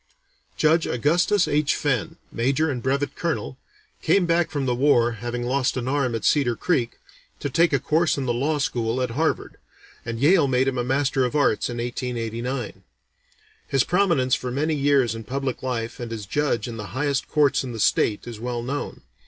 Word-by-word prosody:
Judge 160 +1 +3
Augustus 170 - +2
H. 145 0 +1
Fenn, 130 -8 -1 0.2
Major 135 +6 +1
and 125 -3 -4
Brevet 140 +3 -1
Colonel, 165 -5 -3 0.4
came 180 +3 +3
back 170 0 +2
from 140 -3 -2
the 125 - +1
war, 120 -2 +3
having 120 +2 -4
lost 130 +1 0
an 125 0 -3
arm 130 -3 0
at 110 - -4
Cedar 135 -6 +3
Creek, 125 -4 -1 0.4
to 145 - -3
take 170 +4 +3
a 140 - +3
course 155 +5 +1
in 135 - -2
the 120 - 0
Law 145 +6 0
School 120 -4 -1
at 125 -2 -1
Harvard, 155 +7 -1 0.5
and 115 -1 -5
Yale 155 +2 +4
made 130 0 +2
him 130 -2 0
a - - 0
Master 135 +1 +1
of 125 +1 -1
Arts 145 -7 +2
in 120 - -5
1889. 120 0 -4 0.9
His 135 -2 +2
prominence 170 -9 +2
for 125 - 0
many 150 +5 0
years 140 -5 +2
in 115 0 -7
public 135 +3 -3
life 120 -3 -3
and 120 -2 -6
as 110 -3 -5
judge 125 0 -1
in 115 -2 -6
the 105 -2 -6
highest 140 -1 0
courts 145 -2 +2
in 130 - -5
the 115 - -6
state 105 0 +1
is 115 -3 -8
well 120 0 -3
known. 140 +4 -4
130 Hz, 190 wpm, -24 LUFS, 120-145 Hz, 0.9 s, Yale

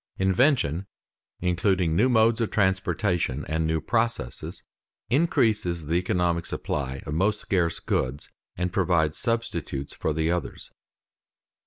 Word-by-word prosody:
_Invention, 95 - +2 0.5
including 90 -1 +1
new 125 +8 +4
modes 115 -1 +4
of 115 - 0
transportation 90 - 0
and 80 0 -1
new 80 0 +1
processes, 115 - -2 0.5
increases 110 - +2
the 80 - -2
economic 90 -1 +1
supply 70 -2 -3
of 75 - -4
most 100 +6 +1
scarce 85 -4 0
goods 65 +2 -2 0.3
and 90 0 -2
provides 85 -5 +1
substitutes 115 - -2
for - - -2
the 80 +2 0
others. 90 -3 -4
90 Hz, 120 wpm, -26 LUFS, 80-105 Hz, 0.5 s, new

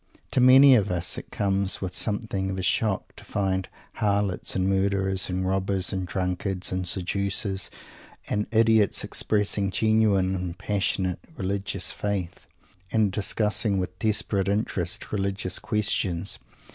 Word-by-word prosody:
To 130 - +2
many 130 +2 +8
of 110 -6 +3
us 90 -1 -1
it - - -13
comes 100 -1 0
with 95 -2 -4
something 105 -3 -1
of 95 - -3
a 95 - -3
shock 105 +1 0
to - - -7
find 95 -2 -1 0.3
harlots 100 -3 0
and 95 0 +1
murderers 95 0 +1
and 95 0 -1
robbers 95 0 0
and 95 -1 -2
drunkards 90 0 -2
and 95 -1 -2
seducers 100 +2 -2 0.6
and 105 0 -1
idiots 110 -2 +3
expressing 105 -1 +1
genuine 105 -3 +2
and 90 -2 -4
passionate 95 -2 -1 0.2
religious 100 -2 -2
faith, 100 -4 -4 0.4
and 110 -3 +2
discussing 105 +1 0
with 90 -1 -4
desperate 100 -2 0
interest 100 +2 -2
religious 100 -2 -1
questions. 100 -4 0
95 Hz, 135 wpm, -26 LUFS, 95-105 Hz, 0.6 s, many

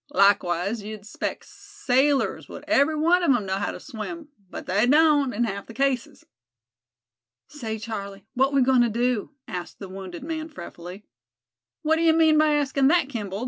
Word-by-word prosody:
Likewise, 200 +1 +2
you'd 215 0 -8
expect 205 - -5
sailors 295 -10 0
would 290 - -9
every 310 0 +3
one 335 +4 +3
of 345 - +1
'em 215 -5 -2
know 190 0 -1
how 200 - -2
to - - -8
swim; 300 +5 -7 0.2
but - - -8
they 205 +5 +2
don't, 295 -1 +4
in 235 +2 -1
half 200 -3 -4
the 230 - -11
cases." 270 -1 -1 1.2
"Say, 225 -7 -5
Charlie, 200 -3 -7
what 265 +1 +2
we 275 -2 +3
goin' 255 -1 +4
to 240 - +3
do?" 235 0 0 0.2
asked 180 -1 -6
the 195 - -8
wounded 190 +2 -8
man, 315 0 -4
fretfully. 180 - -10 0.8
"What 315 +1 +2
d'ye 330 0 +4
mean 320 -1 +4
by 310 -1 +4
askin' 275 -2 +2
thet, 335 -4 +2
Kimball?" 205 -6 -5
250 Hz, 175 wpm, -24 LUFS, 205-300 Hz, 1.2 s, don't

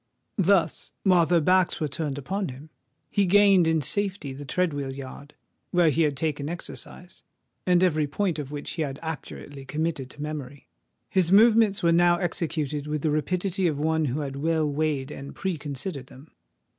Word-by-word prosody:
Thus, 190 -1 +2
while 180 -4 +4
their 175 +1 +4
backs 185 +2 +3
were 155 - 0
turned 145 -1 -3
upon 190 +7 -3
him, 140 +5 -11 0.4
he 200 -2 +2
gained 195 -2 +5
in 160 -2 +2
safety 190 -4 -1
the 145 +2 -8
tread 180 +2 0
wheel 140 -2 -3
yard 140 +2 -9 0.3
where 175 -3 +4
he 160 - +1
had 150 -3 +1
taken 150 -1 -2
exercise, 175 +1 -8 0.5
and 180 0 +4
every 155 -5 +2
point 175 +2 -1
of 140 -3 -5
which 145 -1 -5
he 165 - -4
had 140 -3 -3
accurately 145 -3 -7
committed 150 -1 -3
to 145 - -15
memory. 145 -3 -6 0.4
His 185 -3 +1
movements 215 -1 +5
were 170 - +4
now 175 +1 +4
executed 155 -4 -2
with 150 -1 -3
the 155 - +2
rapidity 180 +4 0
of 150 -3 -1
one 160 +1 +1
who 140 +3 -1
had 135 -1 -5
well 160 +1 +1
weighed 145 -2 -1
and 140 -1 -8
pre 190 -2 -2
considered 140 -1 -4
them. 135 +4 -15
155 Hz, 180 wpm, -26 LUFS, 145-180 Hz, 0.5 s, gained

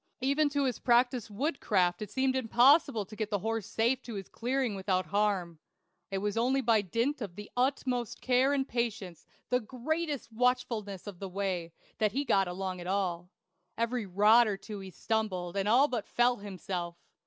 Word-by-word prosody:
Even 280 +3 +2
to 285 0 0
his 255 -3 -1
practised 245 -1 +2
woodcraft 205 - 0
it 210 - -5
seemed 260 +3 +1
impossible 260 0 +4
to 215 - -11
get 215 -1 -3
the 205 - +1
horse 225 +1 -3
safe 235 +4 +1
to 235 -4 -8
his 195 -2 -6
clearing 255 -1 -1
without 190 -2 0
harm. 185 -3 0 0.5
It 195 - -2
was 205 +1 -2
only 255 +4 +2
by 225 -4 +3
dint 235 - -1
of 195 -6 -5
the 210 +1 -9
utmost 250 -2 -1
care 260 +2 +3
and 275 -1 0
patience, 225 -7 -3 0.2
the 250 - +4
greatest 275 +4 -3
watchfulness 225 -5 -1
of 200 -4 -8
the 195 - -5
way, 185 -3 -2 0.3
that 215 -2 +2
he 280 +3 -1
got 195 -6 +3
along 185 0 -4
at 175 - -7
all. 180 -3 -1 0.5
Every 230 -1 -1
rod 210 +5 +5
or 205 -2 -1
two 210 +1 -8
he 190 -1 -8
stumbled, 190 -3 -2
and 200 +1 0
all 260 +6 +5
but 240 -6 -3
fell 245 +1 +2
himself. 180 -3 -5
220 Hz, 180 wpm, -30 LUFS, 195-250 Hz, 0.5 s, rod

